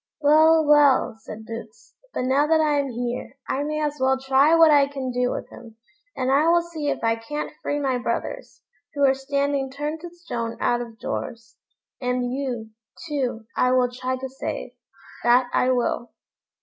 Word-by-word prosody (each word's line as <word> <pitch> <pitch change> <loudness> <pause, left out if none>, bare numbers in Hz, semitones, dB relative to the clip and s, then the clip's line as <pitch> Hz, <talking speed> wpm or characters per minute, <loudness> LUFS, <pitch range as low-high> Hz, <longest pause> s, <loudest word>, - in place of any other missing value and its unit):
"Well! 315 +2 +5
well!" 290 -5 +4
said 220 0 -10
Boots; 225 -1 -10 0.2
"but - - -3
now 275 +3 +2
that 320 0 +4
I 300 -2 +2
am 280 -1 -1
here, 245 +2 -4
I 275 - -1
may 305 +1 -2
as 295 0 -2
well 265 0 +2
try 270 +4 +4
what 325 -1 +7
I 285 -2 +5
can 270 -2 -4
do 250 0 0
with - - -4
him; 230 -2 -13 0.4
and 260 0 0
I 290 +4 +4
will 340 0 +4
see 320 -4 -4
if - - -3
I 225 0 +2
can't 295 +7 -5
free 290 - -2
my 265 -3 0
brothers, - - -4 0.3
who 285 -1 +3
are 265 - +5
standing 280 0 -1
turned 295 +4 -4
to 345 - -7
stone 240 -10 -5
out 240 0 +1
of 230 -2 -9
doors; 205 - -5 0.5
and 250 0 -1
you, 245 -5 -4 0.4
too, 255 -7 -2
I 250 0 +2
will 250 -1 +2
try 255 +1 -3
to 265 +1 -5
save, 265 +1 -5 0.5
that 245 +1 +4
I 255 - +2
will." 245 -1 0
265 Hz, 185 wpm, -24 LUFS, 245-295 Hz, 0.5 s, what